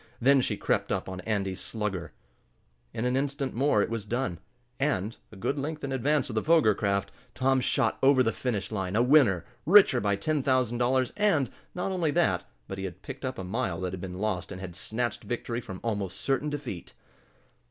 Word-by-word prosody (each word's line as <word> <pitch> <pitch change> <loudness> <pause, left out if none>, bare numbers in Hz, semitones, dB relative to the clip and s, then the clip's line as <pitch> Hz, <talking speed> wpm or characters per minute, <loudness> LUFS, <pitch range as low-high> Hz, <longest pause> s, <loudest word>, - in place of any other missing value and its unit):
Then 135 +2 +5
she - - -1
crept - - 0
up - - -1
on 95 0 -5
Andy's 95 -3 -1
Slugger. 100 -6 -3 0.8
In 110 - -3
an 125 +1 +1
instant 140 -1 -1
more 120 -4 +3
it - - -3
was 115 -2 -2
done, 105 -6 -2 0.4
and, 115 -7 0 0.2
a - - -12
good 135 +9 -2
length 155 +2 -4
in 140 - -3
advance 145 +3 +1
of 125 - -5
the 110 - +1
Foger 155 -8 +5
craft, 100 0 -1 0.2
Tom 130 0 +2
shot - - +1
over 135 -1 +6
the 115 - +2
finish 110 -4 -3
line 95 -2 -2
a 115 - +4
winner, 125 - +5 0.2
richer 180 -9 +6
by 100 -1 +2
ten 150 +9 0
thousand 130 -3 +1
dollars, 130 +1 +2
and, 170 - +2 0.2
not 180 +2 -2
only 175 -4 +1
that, 145 - +2 0.2
but 95 - -6
he 95 - -3
had 95 +1 -8
picked 135 0 -8
up 130 -1 -3
a 95 - -4
mile 95 -3 -2
that 90 -1 -2
had 95 - -5
been 90 -1 -6
lost, 100 -3 -2
and 95 - -6
had 90 -3 -7
snatched 120 +5 -3
victory 120 0 -3
from 95 -5 -8
almost 100 -5 -2
certain 140 +2 0
defeat. 135 - -6
120 Hz, 205 wpm, -28 LUFS, 100-135 Hz, 0.8 s, over